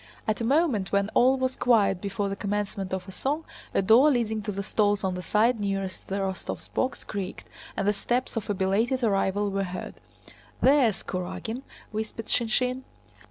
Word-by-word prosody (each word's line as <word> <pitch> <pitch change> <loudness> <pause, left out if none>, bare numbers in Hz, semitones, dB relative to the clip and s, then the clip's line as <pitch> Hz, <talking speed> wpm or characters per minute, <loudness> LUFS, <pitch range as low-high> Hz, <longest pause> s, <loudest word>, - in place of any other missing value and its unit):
At 215 +1 0
a - - 0
moment 260 - +2
when 200 0 +2
all 260 +2 +5
was 260 0 -1
quiet 210 -6 +3
before 200 0 -2
the 195 - -2
commencement 200 -1 -2
of 190 0 -3
a - - -7
song, 285 - -2 0.3
a - - +1
door 230 +9 +7
leading 225 -5 +1
to 210 0 -3
the 200 0 -3
stalls 205 0 +1
on 190 -1 0
the 180 - -4
side 220 +6 +2
nearest 195 -2 -3
the 195 - -2
Rostóvs' 190 -1 -4
box 260 - -1
creaked, 195 -3 -5 0.3
and 195 - 0
the 205 - +4
steps 245 +6 -1
of 220 -1 -3
a 205 - +1
belated 220 +8 +1
arrival 200 -1 +1
were 195 0 0
heard. 185 -1 -5 0.7
"There's 260 -7 +4
Kurágin!" 210 +6 -4 0.3
whispered 220 +1 -4
Shinshín. 250 +2 +1
210 Hz, 180 wpm, -27 LUFS, 195-240 Hz, 0.7 s, door